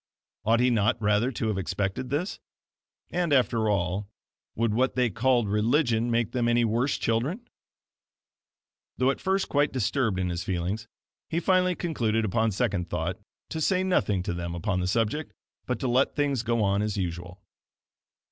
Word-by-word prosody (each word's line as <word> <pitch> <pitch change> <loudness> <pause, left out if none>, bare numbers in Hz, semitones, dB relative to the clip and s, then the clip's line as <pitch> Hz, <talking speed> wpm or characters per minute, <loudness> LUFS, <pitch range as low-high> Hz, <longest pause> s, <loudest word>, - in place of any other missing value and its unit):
Ought 115 +2 +3
he 125 0 +4
not 110 0 +2
rather 105 +4 +2
to 115 -2 -2
have 100 -3 -1
expected 100 +6 -2
this? 155 +8 -2 0.7
And 175 -2 0
after 120 -5 +3
all, 100 +1 -1 0.5
would 115 -1 +1
what 130 +4 +1
they 125 -3 +2
called 120 +1 +2
religion 115 +3 +2
make 115 -2 +1
them 120 -2 0
any 120 0 +3
worse 120 +5 +1
children? 140 - -1 1.5
Though 130 +1 +3
at - - -6
first 190 +1 +1
quite 145 0 +2
disturbed 120 -3 0
in 90 -1 0
his 85 0 -3
feelings, 95 +5 -2 0.4
he 165 - 0
finally 185 0 +2
concluded 115 -11 0
upon 110 +3 +1
second 100 -5 -1
thought - - -2 0.3
to 160 - -4
say 185 +3 +2
nothing 105 - +1
to 90 - -2
them 85 0 -4
upon 95 +1 -1
the 90 - -1
subject, 115 +9 -1 0.3
but 125 - -1
to 130 - 0
let 125 +3 +2
things 140 -4 +1
go 115 -1 0
on 100 0 +2
as 105 -1 -2
usual. 90 0 -4
115 Hz, 165 wpm, -27 LUFS, 100-130 Hz, 1.5 s, he